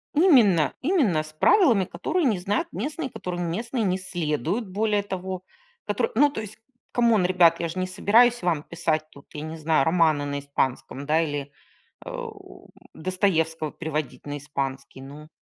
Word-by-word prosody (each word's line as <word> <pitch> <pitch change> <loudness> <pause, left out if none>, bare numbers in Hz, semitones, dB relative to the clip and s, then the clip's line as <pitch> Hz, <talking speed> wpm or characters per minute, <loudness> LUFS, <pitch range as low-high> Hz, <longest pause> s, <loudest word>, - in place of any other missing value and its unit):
Именно 235 - +5
именно 255 - +2
с 155 - -11
правилами, 230 - +4
которые 315 - -1
не 225 -7 +2
знают 200 +4 -1
местные, 280 - -3
которым 175 -4 -4
местные 230 +6 -2
не 185 -2 +1
следуют, 175 - -2
более 205 +1 0
того. 185 -1 -5 0.4
Которые, 475 - -1
ну, 290 - +5
то 280 - -5
есть, 215 0 -9 0.4
come 235 -2 +3
on, 190 -4 +2
ребят, 175 -2 +4
я 170 - -2
ж 160 - -7
не 185 - -1
собираюсь 235 +6 +4
вам 165 -4 0
писать 160 -2 -2
тут, 140 - -16
я 150 - -6
не 160 +1 -6
знаю, 155 -3 +2
романы 160 -3 +3
на 140 0 -3
испанском, 140 -1 -3
да, 155 +3 +2
или, 145 -3 -3 0.5
э, - - -6
у - - -9 0.2
Достоевского 165 -4 0
переводить 155 -2 -4
на 145 0 -4
испанский, 135 -2 -5
ну. 145 +3 -11
175 Hz, 165 wpm, -25 LUFS, 155-210 Hz, 0.5 s, Именно